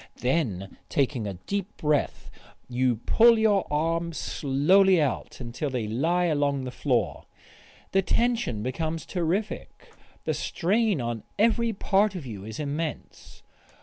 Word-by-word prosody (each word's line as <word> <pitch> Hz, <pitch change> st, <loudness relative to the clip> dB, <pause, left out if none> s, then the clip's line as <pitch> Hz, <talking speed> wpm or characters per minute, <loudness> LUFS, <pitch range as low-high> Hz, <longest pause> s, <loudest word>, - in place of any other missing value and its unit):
Then 115 Hz, -, -1 dB
taking 130 Hz, -6 st, 0 dB
a 100 Hz, -, -4 dB
deep 200 Hz, -, -4 dB
breath 150 Hz, -2 st, -1 dB, 0.4 s
you 125 Hz, 0 st, +1 dB
pull 230 Hz, -, +5 dB
your 210 Hz, -3 st, +3 dB
arms 165 Hz, +2 st, 0 dB
slowly 175 Hz, +9 st, +3 dB
out 145 Hz, -6 st, -2 dB
until 125 Hz, +4 st, -4 dB
they 125 Hz, -4 st, -2 dB
lie 160 Hz, +11 st, +1 dB
along 145 Hz, -4 st, +1 dB
the 130 Hz, -, -5 dB
floor. 120 Hz, -, -1 dB, 0.7 s
The 195 Hz, -, +3 dB
tension 230 Hz, -, 0 dB
becomes 160 Hz, +6 st, -3 dB
terrific, 185 Hz, +4 st, -3 dB, 0.3 s
the -, -, 0 dB
strain 200 Hz, -, 0 dB
on 115 Hz, -2 st, -3 dB, 0.2 s
every 230 Hz, +2 st, +3 dB
part 200 Hz, 0 st, +1 dB
of 170 Hz, -6 st, -6 dB
you 105 Hz, -6 st, -7 dB
is 110 Hz, +1 st, -7 dB
immense. 150 Hz, 0 st, -5 dB
155 Hz, 130 wpm, -26 LUFS, 125-195 Hz, 0.7 s, pull